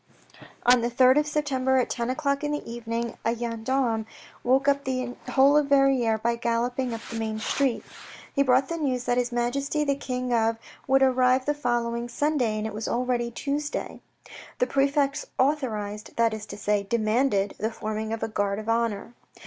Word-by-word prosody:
On 245 0 +6
the 235 - 0
3rd 255 +3 +5
of 300 - -1
September 265 -3 +1
at 255 - +2
ten 235 0 -2
o'clock 280 +1 -1
in 295 - -1
the 295 - -3
evening, 230 0 -4
a 230 +1 +1
gendarme 230 0 -1 0.4
woke 265 +3 +2
up 280 0 +3
the 255 -2 -3
whole 275 +2 +5
of 300 -1 +3
Verrieres 270 -6 +3
by 235 0 +2
galloping 240 +2 -1
up 230 0 -5
the 230 - -4
main 220 -1 -2
street. 255 +3 0 0.5
He 280 - +2
brought 265 0 +3
the 335 - -3
news 260 -6 -1
that 245 0 +1
His 245 0 -1
Majesty 275 +5 -1
the 280 -1 +1
King 255 -2 -3
of 225 -1 +2 0.3
would 270 0 +4
arrive 255 0 +3
the 295 - +1
following 240 -3 -1
Sunday, 250 -4 0
and 215 - -3
it 220 - -4
was 215 +1 -4
already 245 -1 0
Tuesday. 290 +5 -4 0.6
The - - +2
prefect 275 - +1
authorised, 220 -7 -1
that 230 -1 +2
is 215 -1 -6
to 205 - -8
say, 210 0 +1
demanded 215 0 +1
the 220 - 0
forming 215 -1 -4
of 225 - -3
a - - 0
guard 205 -2 -1
of 215 +1 -7
honour. 230 -1 -1
245 Hz, 185 wpm, -26 LUFS, 225-275 Hz, 0.6 s, On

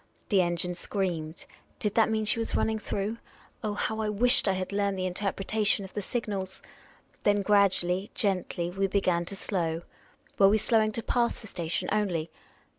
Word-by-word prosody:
The 195 -3 +4
engine 175 0 0
screamed. 175 -4 -3 0.3
Did 210 -2 -1
that 225 -1 +4
mean 220 -1 0
.she 220 +2 +3
was 225 - -2
ruiniing 220 -1 0
through? 210 +3 -3 0.4
Oh, 210 -1 -2
how 220 +1 -1
I 215 - -1
wished 245 +4 +5
I 195 - +3
had 185 0 -3
learned 200 -1 0
the 185 - -1
interpreta 195 +3 -1
tion 200 -1 +2
of 190 - -12
the 205 - -3
signals! 200 -3 -4 0.6
Then 205 -1 +2
gradually, 195 -1 +2
gently, 180 -3 0
we 195 +1 0
began 185 -3 +1
to 200 - -6
slow. 170 -4 -2 0.6
Were 195 -1 +7
we 215 - +4
slowing 220 0 +2
to 230 - -2
pass 240 -1 0
the 220 - -10
station 175 -1 -2
only 185 -6 0
200 Hz, 180 wpm, -28 LUFS, 180-215 Hz, 0.6 s, Were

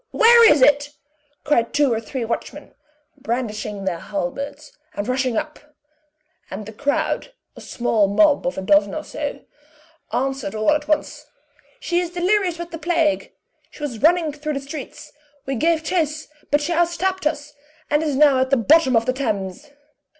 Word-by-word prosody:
Where 465 0 +7
is 295 -3 +4
it?" 290 +1 +3 0.5
cried 235 -6 +1
two 290 -4 +3
or 225 - -2
three 240 +1 -5
watchmen, 230 - -5 0.5
brandishing 215 -5 -4
their 175 -3 -2
halberds, 280 - -5 0.2
and 205 - -4
rushing 255 -2 0
up; 305 0 -4 0.9
and 200 +3 -7
the 220 - -9
crowd 285 - -2 0.2
a - - -12
small 225 -4 0
mob 285 +8 +3
of 270 - -3
a 190 - -3
dozen 295 +9 +3
or - - -4
so - - -5 0.7
answered 265 -6 -2
all 215 +5 +2
at 300 -1 0
once: 305 -1 -2 0.5
"She 350 -6 0
is 355 -1 -2
delirious 360 0 0
with 345 0 -7
the 330 - -7
plague; 330 -2 0 0.4
she 295 - -12
was 245 -7 -5
running 325 -1 +3
through 300 +1 -4
the 275 - -2
streets; 275 0 -9 0.3
we 270 - -2
gave 320 +5 +1
chase, 310 -3 -1 0.2
but 290 +1 +2
she 325 +4 -1
out 340 +1 +3
stepped 375 0 -1
us, 295 -1 -4 0.4
and 295 +1 +3
is 300 -3 -1
now 280 -2 +5
at 260 0 +1
the 275 - +3
bottom 265 +2 +4
of 225 0 +3
the 255 - 0
Thames." 220 +1 -4
290 Hz, 170 wpm, -21 LUFS, 245-315 Hz, 0.9 s, Where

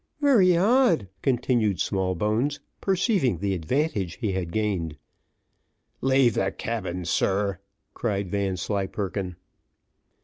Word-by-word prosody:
"Very 215 - +5
odd," 205 - +3
continued 120 - +1
Smallbones, 105 - 0 0.2
perceiving 185 - +1
the 100 +3 -1
advantage 95 - -1
he 110 -5 -2
had 90 -3 -3
gained. 90 -7 -1 1.0
"Leave 130 -3 +4
the 95 0 0
cabin, 95 -7 -4
sir," 100 +3 0 0.3
cried 100 -5 -2
Vanslyperken. 95 -1 -2
105 Hz, 95 wpm, -25 LUFS, 95-135 Hz, 1.0 s, Very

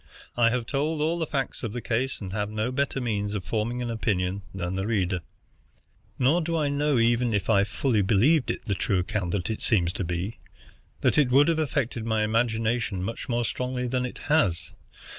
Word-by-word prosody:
I 120 -1 +4
have 120 0 -1
told 150 +5 -1
all 160 +3 +1
the 160 - -1
facts 135 -2 -2
of 115 -4 -4
the 120 - -3
case, 125 +3 -1
and 95 -2 -5
have 105 0 -1
no 110 +3 -2
better 140 +1 -1
means 105 -4 -1
for - - 0
forming 110 +7 -2
an 120 - -3
opinion 100 -4 -1
than 90 -1 -3
the 95 +2 -2
reader. 95 -5 0 1.0
Nor 140 +7 +3
do 165 0 -1
I 150 -2 +1
know, 145 -1 +1
even 120 0 +2
if 100 +2 0
I 100 -2 +5
fully 110 +1 +1
believed 120 - +3
it - - -3
the 100 - 0
true 95 +1 0
account 90 -1 -1
it 110 - -3
seems 90 -6 +2
to 100 - -3
be, 90 +5 -3 0.6
that - - +3
it 140 -4 +4
would 140 +3 +5
have 165 -1 +1
affected 135 -6 -1
my 110 -1 +1
imagination 110 -2 0
much 115 +7 -5
more 120 0 +1
strongly 125 +3 -2
than 125 +1 0
it - - -9
has. 95 - +2
115 Hz, 200 wpm, -26 LUFS, 100-130 Hz, 1.0 s, I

